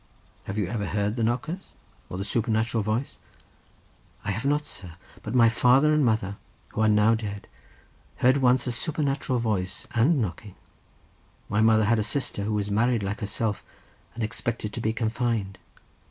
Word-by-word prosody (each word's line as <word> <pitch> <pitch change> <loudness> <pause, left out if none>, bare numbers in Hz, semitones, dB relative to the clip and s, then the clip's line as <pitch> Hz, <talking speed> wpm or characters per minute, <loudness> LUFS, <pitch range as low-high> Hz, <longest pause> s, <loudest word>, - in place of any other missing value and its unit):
"Have 100 - -5
you 105 - +1
ever 105 +1 -3
heard 105 +2 -1
the 120 - -2
knockers, 125 +11 -2 0.3
or 90 - -5
the 100 - -3
supernatural 110 +1 0
voice?" 110 +6 -2 1.1
"I 105 - 0
have 110 +6 -3
not, 145 +1 +1
sir; 90 - -8 0.3
but 110 +3 -5
my 120 -2 +7
father 125 +6 +4
and 150 -1 +3
mother, 110 -4 0 0.3
who 110 - -3
are 110 - +4
now 105 +1 +5
dead, 105 -3 -4 0.7
heard 130 +2 +4
once 125 -2 +3
a 125 - -1
supernatural 140 -1 -1
voice, 105 -6 -2
and 135 +7 +3
knocking. 100 -2 -4 0.9
My 105 +1 +2
mother 110 -1 +5
had 115 +1 +3
a - - +1
sister 110 -4 -1
who 110 - -1
was 105 -1 -1
married 115 +1 +2
like 100 +2 -3
herself, 105 0 -2 0.5
and 115 - -3
expected 110 0 -3
to 120 - -4
be 110 - +1
confined. 115 -3 -1
110 Hz, 170 wpm, -26 LUFS, 105-125 Hz, 1.1 s, my